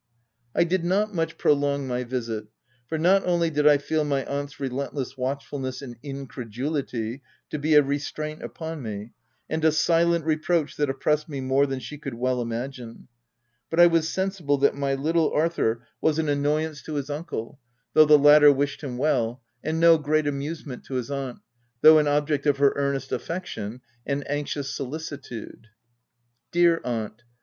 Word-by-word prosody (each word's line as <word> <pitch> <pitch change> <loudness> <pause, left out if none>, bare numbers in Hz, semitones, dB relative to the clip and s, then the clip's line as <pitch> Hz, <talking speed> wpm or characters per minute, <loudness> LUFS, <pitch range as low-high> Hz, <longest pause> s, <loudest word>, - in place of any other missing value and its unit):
I - - +5
did 175 +1 0
not 205 +4 +1
much 165 -2 -2
prolong 140 -1 +2
my 125 0 -2
visit, 115 -4 -4 0.4
for, 160 - -2
not 185 +5 +4
only 170 -2 +1
did 150 0 +2
I 145 -1 +7
feel 155 +2 -1
my 140 -2 -1
aunt's 145 +1 -4
relentless 135 0 -3
watchful 140 +2 -3
ness 130 -1 -4
and 120 -3 -8
incredulity 135 -2 -4 0.3
to 150 - -3
be 155 +1 +2
a 150 - +8
restraint 145 +2 -4
upon 160 -2 -6
me, 110 -1 -6 0.4
and 160 0 -3
a 160 - +5
silent 170 +1 +2
reproach 160 0 0
that 145 -2 +1
oppressed 150 +3 0
me 140 -2 -4
more 135 +2 +2
than 135 -1 -3
she 130 +4 -8
could 140 -5 -6
well 125 +1 0
imagine, 120 +1 -6 0.6
but 165 - -1
I 175 - +10
was 165 -2 +3
sensi 190 0 -2
ble 145 0 +2
that 140 - +3
my 140 -1 -1
little 160 +3 +1
Arthur 150 -8 0 0.2
was 160 -1 +2
an 160 -2 0
annoyance 150 +1 0
to 155 - -8
206 145 -2 -2
THE 145 - -3
TENANT 155 +3 -5
his - - -3
uncle, 115 +5 -6 0.3
though 155 - +7
the 150 0 +7
latter 145 0 +8
wished 140 +2 -1
him 125 -4 -4
well, 125 -3 0 0.2
and 160 +1 -1
no 165 -1 +6
great 155 +1 +1
amusement 145 -1 -4
to 135 - -6
his 125 +1 -3
aunt, 135 -3 -4 0.4
though 155 0 +9
an 150 - +1
object 145 0 +1
of 145 -1 +3
her 140 0 +4
earnest 140 -1 -1
affection 125 - -4 0.3
and 140 0 -2
anxious 145 -1 -3
soli 140 +2 -4
citude. 140 -8 -8 0.9
Dear 170 -1 +4
aunt 110 -1 -4
145 Hz, 180 wpm, -25 LUFS, 130-155 Hz, 0.9 s, I